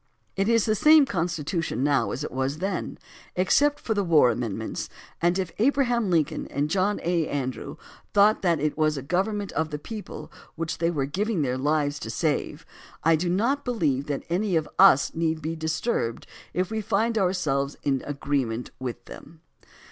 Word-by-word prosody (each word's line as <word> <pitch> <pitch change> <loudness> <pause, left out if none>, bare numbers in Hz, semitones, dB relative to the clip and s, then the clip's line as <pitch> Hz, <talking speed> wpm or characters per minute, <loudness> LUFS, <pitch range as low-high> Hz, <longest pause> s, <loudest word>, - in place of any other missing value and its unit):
It 195 +2 +1
is 230 -2 +3
the 215 - +2
same 305 +6 +6
Constitution 165 - -2
now 140 -7 +2
as 130 +7 -4
it - - -5
was 135 +3 -2
then, 190 +2 -3 0.4
ex 185 +1 +3
cept 290 0 +3
for 225 - -2
the 205 -1 0
war 155 -8 +5
amendments, 110 -2 -4 0.3
and 175 +2 +2
if 185 -3 -2
Abraham 240 -3 +2
Lincoln 160 -5 0
and 145 +2 -2
John 200 +2 +1
A. 170 -2 +1
Andrew 130 -3 -4 0.3
thought 205 +2 +4
that 170 -4 +2
it 150 +1 -1
was 155 -1 +1
a 135 - -5
government 195 +6 -1
of 160 0 -1
the 150 - -4
people 210 +7 -8 0.2
which 165 0 -4
they 165 0 +2
were 145 -5 -1
giving 190 +4 -1
their 125 -2 -1
lives 145 +1 0
to 110 - -6
save, 150 +5 -2 0.4
I 165 +1 +5
do 175 +3 -1
not 240 +11 +1
believe 150 - 0
that 145 -2 -3
any 185 +2 0
of 160 -2 +1
us 190 -8 +6
need 160 -1 0
be 160 +2 -4
disturbed 160 - -2 0.3
if 185 +3 -1
we 220 0 -1
find 220 +3 0
ourselves 155 -9 0
in 135 -2 +1
agreement 135 -5 -2
with 120 -2 -5
them. 160 +1 -12
165 Hz, 180 wpm, -25 LUFS, 145-200 Hz, 0.4 s, same